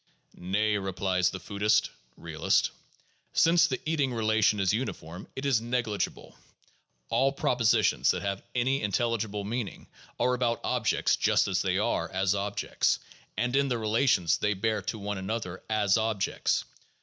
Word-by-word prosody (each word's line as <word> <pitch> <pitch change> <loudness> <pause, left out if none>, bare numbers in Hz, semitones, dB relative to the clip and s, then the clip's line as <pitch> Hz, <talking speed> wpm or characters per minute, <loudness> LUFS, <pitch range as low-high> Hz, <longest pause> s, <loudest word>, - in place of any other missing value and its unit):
Nay, 105 +3 0
replies 95 -1 0
the 95 - -6
foodist 105 +2 +1 0.3
(realist): - - 0 0.6
Since 170 +1 +5
the 130 -5 -2
eating 150 -4 0
relation 110 -2 +2
is 95 0 +2
uniform, 90 -7 -4
it 135 - -5
is 130 -5 +2
negligible. 115 -4 -3 0.7
All 130 +4 +2
propositions 125 -4 +2
that - - +1
have 100 -1 -2
any 130 +3 +1
intelligible 105 0 -1
meaning 110 0 -4 0.3
are 125 - +2
about 120 -2 0
objects - - +1
just - - +2
as - - 0
they - - 0
are - - 0
as 95 +1 +1
objects, 100 0 0 0.4
and 125 +4 0
in 140 0 +3
the 125 - 0
rela 115 +4 +1
tions 85 -8 +2
they 105 0 +1
bear 110 +2 0
to 110 - -4
one 105 -1 -4
another 95 -2 -4
as 105 -2 +2
objects. 110 -3 0
110 Hz, 150 wpm, -28 LUFS, 100-125 Hz, 0.7 s, Since